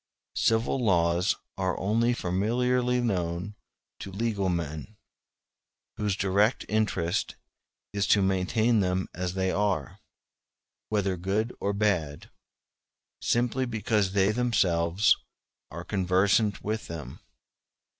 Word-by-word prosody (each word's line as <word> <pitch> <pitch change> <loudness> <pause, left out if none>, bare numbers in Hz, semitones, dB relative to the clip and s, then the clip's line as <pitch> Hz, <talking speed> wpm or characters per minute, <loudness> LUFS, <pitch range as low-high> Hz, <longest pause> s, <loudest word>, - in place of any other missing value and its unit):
Civil 115 +3 +1
laws 85 -2 +2 0.2
are 95 -1 -1
only 115 +5 +2
familiarly 125 +5 +1
known 90 -3 -2 0.5
to 100 - -7
legal 100 -2 -1
men, 85 +4 -4 1.0
whose 105 -2 0
direct 100 +4 +1
interest 105 -6 0 0.6
it - - -6
is 100 - +1
to 100 - +4
maintain 95 +5 +2
them 95 -1 0
as 90 0 -3
they 95 -1 0
are, 95 -9 -1 0.9
whether 100 -3 0
good 100 +6 -1
or 100 - 0
bad, 95 -8 -1 0.9
simply 125 +2 +1
because 105 -3 0
they 100 0 +3
themselves 100 -6 +2 0.5
are 85 +3 -7
conversant 100 +2 +1
with 110 +1 -3
them. 80 -3 -7
100 Hz, 105 wpm, -27 LUFS, 90-110 Hz, 1.0 s, to